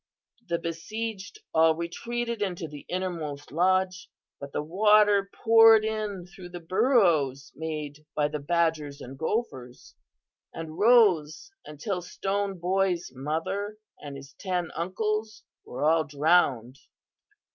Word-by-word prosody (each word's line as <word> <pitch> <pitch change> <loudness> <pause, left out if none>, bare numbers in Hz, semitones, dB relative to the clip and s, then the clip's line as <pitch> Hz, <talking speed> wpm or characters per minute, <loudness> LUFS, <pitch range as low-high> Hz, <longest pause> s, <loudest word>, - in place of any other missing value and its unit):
The 170 -1 0
besieged 200 - -5
all 160 0 +5
retreated 235 +8 -4
into 180 -4 -2
the 145 -1 -11
innermost 165 -6 -4
lodge, 185 +2 +1 0.3
but 140 0 -8
the 150 - -2
water 205 +3 +4
poured 225 -1 +6
in 210 -4 -3
through 180 0 -12
the 175 0 -8
burrows 170 - +2
made 150 -2 -6
by 150 -1 +2
the 150 0 -4
badgers 155 -2 0
and 130 +2 -9
gophers, 135 - -4 0.6
and 160 -1 -7
rose 210 - +4 0.2
until 180 +5 -4
Stone 195 +2 -3
Boy's 180 -2 0
mother 165 +10 -3 0.2
and 140 -1 -8
his 140 +1 -12
ten 180 -3 -2
uncles 215 +5 -2 0.2
were 125 - -5
all 160 +1 +4
drowned. 140 -5 +1
175 Hz, 120 wpm, -27 LUFS, 150-205 Hz, 0.6 s, poured